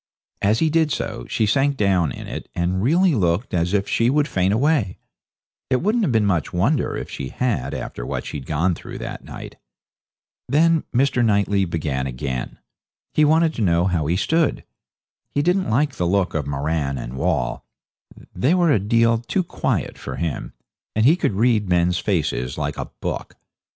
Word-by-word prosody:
As 105 +3 +3
he 160 +4 +2
did 160 -1 +2
so - - -4
she 110 - +1
sank 135 +6 +2
down 95 -6 +2
in - - -8
it, - - -7
and 90 +2 0
really 170 - +3
looked 95 0 0
as 85 0 +1
if 100 -1 +1
she 115 +1 +2
would 150 +2 +2
faint 95 -4 +1
away. 120 - +1 0.7
It 130 +1 +1
wouldn't 220 +4 +2
have 155 - +1
been 110 -3 +3
much 90 -6 0
wonder 120 - +1
if - - -5
she 65 -2 -6
had 125 -3 -1
after - - -6
what - - -4
she'd 70 -2 -6
gone 80 +4 +1
through - - -8
that - - -6
night. - - -9 0.9
Then 160 +3 +3
Mr. 125 -1 +2
Knightley 100 -2 +2
began 75 -6 -2
again. 65 -1 -4 0.6
He 155 - +4
wanted 160 +2 +4
to 115 - -4
know 85 -3 +3
how 85 -5 0
he 85 - +1
stood. 160 - +1 0.7
He 145 - +2
didn't 180 -2 +1
like 135 +5 +2
the 90 -8 -1
look 95 0 +1
of 75 -3 -2
Moran 70 0 -1
and - - -6
Wall 60 -2 -1 0.7
they 130 - +2
were 175 -3 +3
a 130 - +4
deal 115 +3 +3
too 150 +11 -1
quiet - - -2
for - - -6
him, 80 0 -4 0.4
and 110 +1 +2
he 155 +6 +6
could 175 - 0
read 110 -1 +2
men's 90 0 +2
faces 75 - -1
like - - -2
a - - -2 0.2
book. - - -4
100 Hz, 180 wpm, -22 LUFS, 85-140 Hz, 0.9 s, he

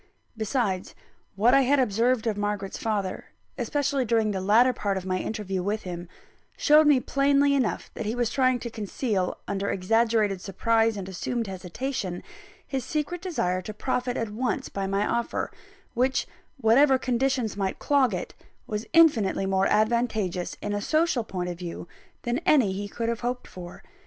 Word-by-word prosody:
Besides, 220 -4 -1 0.4
what 225 +6 +4
I 275 - +6
had 275 +2 +3
observed 240 0 +2
of 220 -2 0
Margaret's 205 -1 -3
father, 205 -4 -2 0.3
especially 280 -2 0
during 225 -2 +1
the 190 -2 -2
latter 230 +6 +4
part 200 -4 -1
of 190 - -5
my 185 -1 -1
interview 195 -4 -3
with 210 +4 -2
him, 175 -1 -6 0.5
showed 305 0 +5
me 290 -3 +6
plainly 280 +2 +2
enough 260 -5 -1
that - - -5
he 220 - -1
was 240 -2 0
trying 255 -1 +3
to 235 - -5
conceal, 205 -2 -2
under 200 0 -2
exaggerated 215 0 +1
surprise 225 +3 +1
and 190 -2 -5
assumed 230 +5 -3
hesitation, 190 +1 -4 0.4
his 265 -2 -3
secret 305 +6 -3
desire 185 - -1
to 210 +3 -8
profit 250 +1 -1
at 225 -2 -2
once 245 +4 -2
by 195 -1 -3
my 195 +2 0
offer; 235 0 -1 0.4
which, 255 +2 +1 0.3
whatever 265 +3 +5
conditions 255 -3 0
might 195 -1 -2
clog 280 -4 +2
it, 180 - -4 0.3
was 210 +1 -4
infinitely 255 - +4
more 190 0 +2
advantageous 215 -5 0
in 205 - -2
a 205 - -1
social 310 -1 +1
point 185 -4 -4
of 175 -1 -5
view, 175 -1 -6 0.4
than 240 +2 0
any 275 - +3
he 200 +2 -4
could 230 +3 -4
have 235 0 -1
hoped 245 +1 -3
for. 175 -1 -10
225 Hz, 165 wpm, -26 LUFS, 195-255 Hz, 0.5 s, I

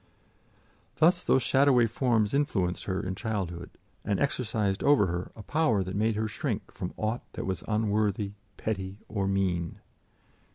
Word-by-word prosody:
Thus 175 +3 +4
those 130 - +3
shadowy 135 -3 +5
forms 115 -2 +1
influenced 100 - 0
her 95 -1 -2
in 95 - -2
childhood, 95 -5 -3 0.3
and 100 - 0
exercised 110 - 0
over 140 -8 +5
her 90 0 -3
a 110 - -9
power 120 -8 +2
that 95 +1 -5
made 110 +1 +1
her 110 +1 0
shrink 105 - -3
from 90 - -5
aught 110 +3 -1
that - - -4
was 95 -3 -3
unworthy, 105 -2 +1 0.3
petty 95 -2 -3
or 100 -2 -1
mean. 90 -4 0
105 Hz, 150 wpm, -29 LUFS, 95-115 Hz, 0.3 s, shadowy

